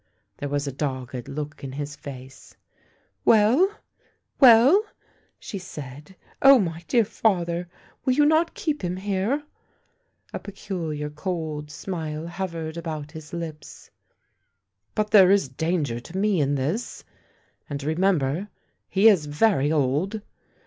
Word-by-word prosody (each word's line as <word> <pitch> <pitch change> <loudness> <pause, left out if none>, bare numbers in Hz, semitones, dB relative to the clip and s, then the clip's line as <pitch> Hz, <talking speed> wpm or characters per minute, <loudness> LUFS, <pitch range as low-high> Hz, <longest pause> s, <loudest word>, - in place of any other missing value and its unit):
There 145 - -5
was 145 0 -1
a 140 - -3
dogged 130 -3 -4
look 150 +1 -6
in 135 -1 -6
his 145 +1 -5
face. 130 -2 -11 0.3
" - - -40
Well? 230 - +5 0.7
well? 265 - +7 0.3
" - - -39
she 200 - -6
said. 150 -1 -10
" - - -28
Oh, 275 0 +9
my 170 -6 -2
dear 235 -3 +3
father 175 -5 0 0.2
!— - - -30
will 255 - +2
you 295 +3 +4
not 315 +2 +2
keep 305 -2 -2
him 180 +1 -2
here? 205 +9 -1 0.5
" - - -39
A - - -3
peculiar 165 -7 -5
cold 155 -2 -4
smile 160 -2 -5
hovered 170 -2 -5
about 155 -3 -5
his 155 -2 -10
lips. 165 -3 -8 0.5
" 100 0 -51
But 215 0 0
there 190 -3 +8
is 195 -6 +4
danger 145 -3 -1
to 165 +10 -9
me 200 -2 +2
in 145 0 +1
this... 155 - -3 0.7
and 140 -1 -4
remember, 160 +1 +1 0.4
he 195 +3 +5
is 185 -9 +5
very 150 -2 +2
old 155 +8 0
165 Hz, 145 wpm, -25 LUFS, 145-200 Hz, 0.7 s, Oh